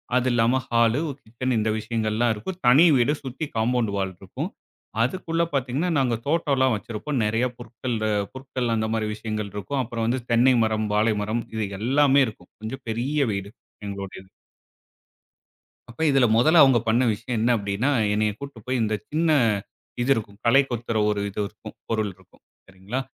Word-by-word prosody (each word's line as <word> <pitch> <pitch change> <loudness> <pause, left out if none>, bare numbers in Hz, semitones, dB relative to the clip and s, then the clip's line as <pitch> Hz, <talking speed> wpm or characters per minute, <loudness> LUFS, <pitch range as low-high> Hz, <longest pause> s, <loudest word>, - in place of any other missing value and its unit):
அது 125 0 +2
இல்லாம, 120 +2 +3
ஹாலு 115 +2 +3
ஒரு 140 - -7
கிச்சன் 120 +2 -2
இந்த 110 +1 0
விஷயங்கள்லாம் 110 +1 0
இருக்கும். 175 - -6
தனி 140 +8 +7
வீடு 125 +5 +3
சுத்தி 135 +4 -4
காம்பவுண்ட் 115 -1 +1
வால் 95 -1 -2
இருக்கும். 95 - -5 0.5
அதுக்குள்ள 165 +4 -1
பார்த்தீங்கன்னா, 135 +6 0
நாங்க 125 -3 +1
தோட்டம்லாம் 140 -6 +2
வச்சிருப்போம். 115 +6 -4
நெறைய 115 +4 +1
புற்கள் 120 0 -5 0.4
புற்கள் 130 -3 -3
அந்த 110 0 0
மாரி 110 -1 -1
விஷயங்கள் 110 -2 -4
இருக்கும். 130 +7 -2
அப்புறம் 115 -1 -3
வந்து 125 +1 0
தென்னை 125 +3 +5
மரம், 110 -1 0
வாழை 110 0 +3
மரம் 115 +3 -2
இது 110 -2 -1 0.2
எல்லாமே 140 +3 +4
இருக்கும். 110 - -11
கொஞ்சம் 130 +4 -6
பெரிய 125 +7 -2 0.2
வீடு 100 +1 -5 0.4
எங்களுடையது. 100 -1 -7 1.6
அப்ப 120 - -9
இதுல 135 -2 +4
மொதல்ல 155 +6 +6
அவுங்க 130 -3 +5
பண்ண 120 +3 +3
விஷயம் 115 +3 -3
என்ன 115 +3 +2
அப்படின்னா, 100 +6 -1 0.2
என்னை 105 0 +2
கூட்டிட்டு 140 -5 -9
போய் 130 -1 0
இந்த 110 0 0 0.2
சின்ன 160 +1 +1 0.7
இது 125 - -1
இருக்கும், 105 -2 -6
களை 135 +4 +6
கொத்துற 115 -2 -2
ஒரு 105 -1 0
இது 100 - -7
இருக்கும், 110 0 -12
பொருள் 110 -3 0
இருக்கும் 95 -1 -24 0.2
சரிங்களா? 95 +7 -5
115 Hz, 160 wpm, -24 LUFS, 110-130 Hz, 1.6 s, தனி